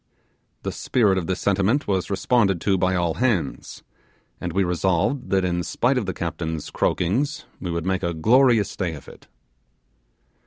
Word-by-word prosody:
The - - -2
spirit 105 -7 +1
of 85 - -5
this 95 0 -1
sentiment 100 +8 +1
was 95 -3 0
responded 100 -2 +2
to 100 - +2
by 95 0 +1
all 85 -2 +1
hands, 105 - -2 0.6
and - - -4
we 95 - +1
resolved 95 - 0
that 95 -1 +2
in 90 -1 0
spite 125 +8 0
of 110 - -5
the 95 - -2
captain's 80 -2 -4
croakings 125 - 0
we 90 - -5
would 85 -1 -2
make 95 0 0
a 85 -1 -2
glorious 115 +4 +3
day 85 -4 -2
of 70 - -12
it. - - -14
95 Hz, 165 wpm, -23 LUFS, 85-110 Hz, 0.6 s, glorious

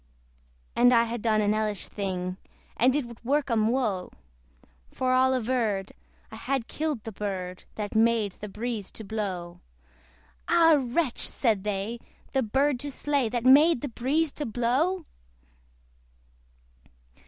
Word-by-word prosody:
And 245 +1 +6
I 230 -1 +5
had 235 0 -4
done 215 -1 +2
an 205 0 +2
hellish 215 -2 -2
thing, 185 -2 -3 0.4
And 255 +3 +3
it 295 -3 0
would 235 0 -12
work 280 +2 0
'em 220 -2 +3
woe: 220 -7 -1 0.8
For 255 0 0
all 260 0 +4
averred, 220 -5 -1 0.4
I 220 - -8
had 260 0 -2
killed 300 -7 -3
the 225 - -6
bird 190 -3 -5
That 210 -1 -4
made 225 -2 +3
the 210 +3 -9
breeze 215 -1 -4
to 220 - -8
blow. 195 -5 -4 0.9
Ah 330 -3 +5
wretch! 255 +2 -1
said 220 -7 +1
they, 210 +3 -3 0.3
the 265 - +2
bird 265 +4 +1
to 290 - -4
slay 280 -3 0
That 240 +1 -2
made 285 +2 +6
the 285 - -3
breeze 280 +7 0
to 295 - -5
blow! 265 - 0
235 Hz, 140 wpm, -27 LUFS, 210-265 Hz, 0.9 s, And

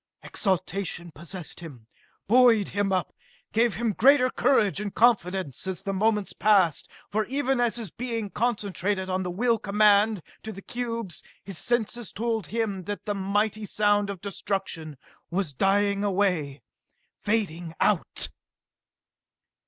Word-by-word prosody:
Exultation 185 -3 -2
possessed 170 +3 -7
him, 140 -10 -10 0.4
buoyed 230 -2 +5
him 200 0 0
up, 185 -1 -1 0.4
gave 230 0 +2
him 230 -2 0
greater 255 +2 +5
courage 210 -8 +2
and 205 -2 -5
confidence 190 - +2
as 190 0 -4
the 195 -1 -2
moments 210 0 +1
passed 195 -7 +3 0.2
for 215 +3 +1
even 270 -1 0
as 240 -1 +2
all 235 - -3
his 195 - -8
being 230 -4 -3
concentrated 200 -4 -1
on 185 0 0
the 180 - -3
will 230 +5 +1
command 210 -1 +3 0.2
to 220 - -6
the 195 -1 -10
cubes, 230 -8 -4 0.2
his 195 -5 -6
senses 240 -1 -1
told 225 -2 -2
him 210 -5 -2
that 205 +1 -5
the 205 - -1
mighty 205 +2 0
sound 205 0 +2
of 195 -3 -6
destruction 190 -6 -3 0.3
was 175 -4 -1
dying 200 +5 +2
away, 180 -8 0 0.6
fading 175 -6 -1
out. 200 -6 +1
205 Hz, 135 wpm, -26 LUFS, 185-225 Hz, 0.6 s, buoyed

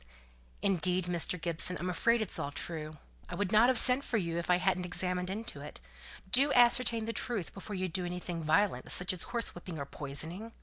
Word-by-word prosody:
"Indeed, 185 -2 +1
Mr. 175 0 -1
Gibson, 170 +2 +1
I'm 180 - -5
afraid 230 +6 +1
it's 205 - -1
all 140 - -3
true. 155 0 -6 0.3
I 175 - -5
would 200 +1 -2
not 220 +2 +5
have 260 - +2
sent 255 +3 +8
for 235 - -1
you 170 -4 -2
if 170 - -6
I 180 - +5
hadn't 180 0 0
examined 180 0 -1
into 195 -7 -6
it. 150 - -10 0.5
Do 275 +5 +4
ascertain 240 -2 +3
the 230 - -4
truth 220 -9 -3
before 205 +1 -7
you 185 0 -2
do 180 +1 -3
anything 175 -1 -5
violent, 160 +6 +1
such 180 +1 +1
as 180 - -7
horsewhipping 180 -7 -4
or 140 - -5
poisoning." 160 +11 -6
180 Hz, 200 wpm, -31 LUFS, 170-220 Hz, 0.5 s, sent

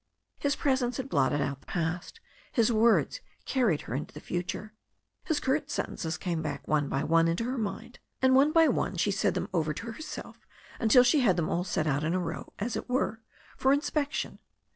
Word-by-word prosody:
His 285 0 +1
presence 260 -3 0
had 265 0 -4
blotted 145 - +2
out 140 -1 -2
the - - -25
past, 175 - -3 0.3
his 230 -1 +3
words 230 - +3 0.2
carried 230 - +1
her - - -7
into 145 +3 -4
the - - -6
future. 180 +6 -4 0.5
His 315 -4 +1
curt 280 +2 0
sentences 160 - -3
came 170 -3 -2
back 150 -2 -5
one 150 -2 +1
by 135 - -1
one 165 +1 +4
into 165 +7 0
her 255 +3 -2
mind, 225 +3 -5 0.2
and 260 0 +4
one 275 +3 +5
by 325 0 +6
one 240 -7 0
she 185 +4 +2
said 195 - +1
them - - -2
over 155 -4 0
to 230 +9 -5
herself 310 +7 -9 0.3
until 235 +2 +6
she 250 +5 +4
had 215 -9 +4
them 165 -2 0
all 175 - 0
set 175 -4 -1
out 145 -1 0
in 165 +3 0
a - - +1
row, 165 -2 -5
as 220 +3 -2
it - - -5
were, 240 -3 0 0.4
for 265 - +3
inspection. 290 0 -1
215 Hz, 205 wpm, -29 LUFS, 165-260 Hz, 0.5 s, by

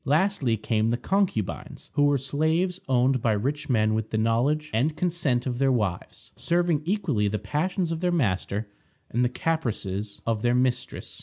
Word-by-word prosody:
Lastly 150 - +1
came 110 +1 0
the 120 - +1
Concubines, 175 - -2
who 145 0 +3
were 145 -1 +3
slaves 160 +7 0
owned 130 0 +3
by 110 -2 +2
rich 140 +9 -2
men 110 -3 +3
with 110 0 -2
the 110 - -1
knowledge 125 +8 +1
and 145 +8 +1
consent 160 -9 0
of 125 -2 -2
their 135 -1 +3
wives, 105 -8 -3
serving 170 -3 +1
equally 170 - 0
the 105 +1 -1
passions 175 - -1
of 165 - -2
their 180 0 +1
master 105 - 0 0.4
and 120 +2 +1
the 125 - +2
caprices 110 - -2
of 115 -2 0
their 120 +1 +2
mistress. 125 0 -1
130 Hz, 170 wpm, -26 LUFS, 110-160 Hz, 0.4 s, who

